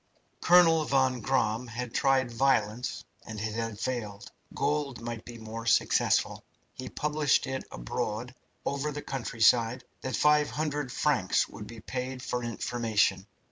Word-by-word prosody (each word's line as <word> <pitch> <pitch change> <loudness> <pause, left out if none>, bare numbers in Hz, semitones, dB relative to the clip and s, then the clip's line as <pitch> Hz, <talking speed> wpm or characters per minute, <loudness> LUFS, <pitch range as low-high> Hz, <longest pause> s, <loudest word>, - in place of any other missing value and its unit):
Colonel 165 -2 +6
von 130 -3 +2
Gramm 115 -1 0
had 120 +1 -5
tried 135 -4 +2
violence, 120 -2 0 0.2
and 110 -2 -7
it 110 +1 -3
had 115 -2 -3
failed. 110 -5 -4 0.2
Gold 145 -4 -1
might 115 -1 -6
be 120 -1 -9
more 115 +1 -7
successful. 110 - +2 0.3
He 130 0 -7
published 150 -1 +1
it 135 0 -4
abroad 110 - -4 0.3
over 140 +2 -1
the 145 0 -6
countryside 115 -1 +2 0.2
that 130 -3 -2
500frs. 150 -1 +1
would 105 - -9
be 115 -1 -10
paid 130 +1 -5
for 125 -1 -2
information. 110 -5 0
125 Hz, 130 wpm, -29 LUFS, 115-135 Hz, 0.3 s, Colonel